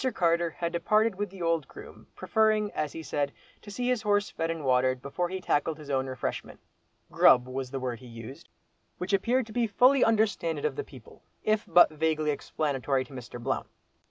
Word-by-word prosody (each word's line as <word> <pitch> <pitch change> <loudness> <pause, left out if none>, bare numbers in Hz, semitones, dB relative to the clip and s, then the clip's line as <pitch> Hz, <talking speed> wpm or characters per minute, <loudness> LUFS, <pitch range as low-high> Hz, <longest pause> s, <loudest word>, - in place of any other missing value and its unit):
Carter 170 -1 +2
had 170 -1 -2
departed 215 +6 +2
with 205 +1 -3
the 185 -2 -8
old 165 -3 0
groom, - - -13
preferring, 215 -2 +1
as 150 -2 -2
he 165 - -7
said, 145 -2 -1 0.3
to 210 - -12
see 245 +4 -3
his 250 -3 +1
horse 205 -1 +1
fed 165 0 -2
and 165 -3 -4
watered 130 0 +2
before 155 +7 -3
he 190 +1 -4
tackled 160 -3 0
his 150 -2 -8
own 135 -1 0
refreshment; 130 -2 -5 0.5
"grub" 125 0 +5
was 130 0 -4
the 135 +1 -4
word 125 -2 -4
he 125 - -13
used, 115 +7 -10 0.5
which 185 +3 -4
appeared 235 +6 +2
to 220 - -12
be 240 -2 +1
fully 250 +6 +4
understanded 205 -9 +1
of - - 0
the 430 - -3
people, - - -15 0.2
if 215 0 +1
but 175 0 +6
vaguely 155 -1 0
explanatory 140 -2 -1
to 140 - -15
Mr. 125 -1 -8
Blount. 135 +3 -2
165 Hz, 195 wpm, -28 LUFS, 135-205 Hz, 0.5 s, but